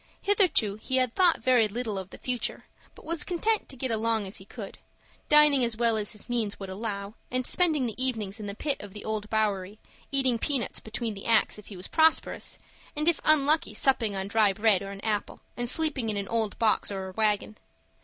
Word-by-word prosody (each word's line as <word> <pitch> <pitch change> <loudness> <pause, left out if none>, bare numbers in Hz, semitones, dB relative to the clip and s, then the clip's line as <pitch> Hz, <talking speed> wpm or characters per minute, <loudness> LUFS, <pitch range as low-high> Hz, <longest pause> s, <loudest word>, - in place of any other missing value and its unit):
Hitherto 365 - +2
he 260 - -1
had 255 -2 +1
thought 360 -3 +3
very 250 -4 +4
little 215 -2 -3
of 190 -1 -8
the - - -11
future, 250 -2 -4 0.3
but - - -15
was 330 -1 0
content 425 +5 -1
to 275 - -7
get 260 -1 -2
along 225 -1 0
as 195 - -4
he 190 - -11
could, 205 -1 -9 0.5
dining 300 -3 +6
as 230 -2 +1
well 230 -1 +2
as 215 +1 -1
his 210 - -6
means 230 -4 -2
would 195 -1 -6
allow, 200 0 -5 0.2
and 255 0 -1
spending 315 -6 +2
the 240 +2 -3
evenings 220 -5 -2
in 210 - -6
the 200 - -5
pit 285 +4 -2
of 205 -2 -10
the 210 - -9
Old 215 -1 -3
Bowery, 205 -2 -1 0.3
eating 260 -4 +2
peanuts 275 -3 -1
between 220 +1 -4
the 195 - -8
acts 225 -2 +3
if 210 - -14
he 200 - -9
was 180 - -3
prosperous, 320 0 +2 0.4
and 300 +2 -1
if 340 -3 +4
unlucky 310 +1 +3
supping 230 -6 +2
on 190 0 -3
dry 215 -1 +3
bread 215 -2 +3
or 195 - -6
an 200 0 -8
apple, 210 -2 -2 0.2
and 240 -1 -1
sleeping 290 -8 +1
in 210 - -1
an 200 -1 -3
old 225 -2 -1
box 220 -2 +2
or 190 -2 -4
a - - -11
wagon. 215 0 0
225 Hz, 215 wpm, -27 LUFS, 205-260 Hz, 0.5 s, dining